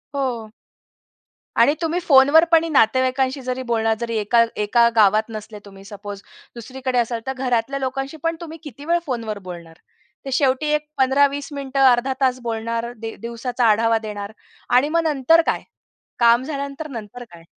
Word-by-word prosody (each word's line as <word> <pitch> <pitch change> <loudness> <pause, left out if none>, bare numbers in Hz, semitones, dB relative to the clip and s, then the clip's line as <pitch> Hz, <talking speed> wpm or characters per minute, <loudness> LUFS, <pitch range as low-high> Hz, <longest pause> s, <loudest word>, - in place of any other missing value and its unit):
हो. 240 -6 -3 1.1
आणि 290 - +5
तुम्ही 335 +1 0
फोनवर 285 0 +6
पणी 330 0 +4
नातेवाईकांशी 260 +1 +2
जरी 255 0 -4
बोलणार 225 -2 0
जरी 230 -1 -3
एका 225 +3 +3
एका 235 +3 +3
गावात 215 0 +4
नसले 215 -1 -8
तुम्ही 195 -1 -14
सपोज, 205 0 -9 0.3
दुसरीकडे 255 +2 -4
असाल, 235 0 -1
तर 265 - -1
घरातल्या 260 0 -1
लोकांशी 270 +3 -4
पण 330 0 0
तुम्ही 325 -1 -8
किती 285 -1 -10
वेळ 340 +2 +2
फोनवर 230 -6 -4
बोलणार? 170 -2 -10 0.5
ते 270 - -5
शेवटी 265 +2 +1
एक 300 0 -1
15-20 280 +2 +2
मिनिटं, 275 -1 -4
अर्धा 245 +2 +1
तास 255 -1 +2
बोलणार, 230 0 -3
दि 225 0 -7
दिवसाचा 235 +1 -2
आढावा 225 +1 +3
देणार 205 -1 -6 0.4
आणि 255 +4 +4
मग 335 +1 +1
नंतर 300 +3 +4
काय? - - 0 0.6
काम 235 +1 +5
झाल्यानंतर, 280 +1 -5
नंतर 235 -1 -8
काय? 170 -1 -14
250 Hz, 155 wpm, -21 LUFS, 225-275 Hz, 1.1 s, फोनवर